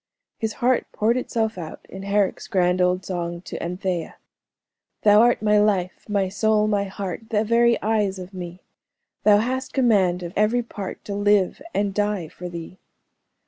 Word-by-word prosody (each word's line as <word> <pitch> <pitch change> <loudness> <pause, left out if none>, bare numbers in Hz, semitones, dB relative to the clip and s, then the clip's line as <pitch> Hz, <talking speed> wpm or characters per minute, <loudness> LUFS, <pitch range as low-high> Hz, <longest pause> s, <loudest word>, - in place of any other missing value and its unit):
His 220 -1 -2
heart 250 +1 +1
poured 225 +3 +2
itself 225 -5 -1
out 160 -2 -8
in 190 - -9
Herrick's 200 0 0
grand 180 -1 +2
old 180 +1 +1
song 170 -2 -4
"To - - -7
Anthea:" 180 -1 -3 0.9
"Thou 210 0 +7
art 240 -1 +3
my 210 0 +4
life, 200 -2 0
my 200 -2 +1
soul, 215 +2 +2
my 205 -1 +1
heart, 195 +2 -6
The 215 -2 +1
very 235 +1 +3
eyes 210 -3 +1
of 185 +1 -9
me 180 -1 -7 0.6
Thou 210 -1 +7
hast 260 +4 -2
command 195 -9 +2
of 170 0 -6
every 220 +4 +2
part, 205 -4 -7
To 205 - -4
live 205 -2 +2
and 200 -1 0
die 205 -5 -1
for 180 +2 -8
thee." 170 +2 -8
205 Hz, 165 wpm, -23 LUFS, 180-220 Hz, 0.9 s, Thou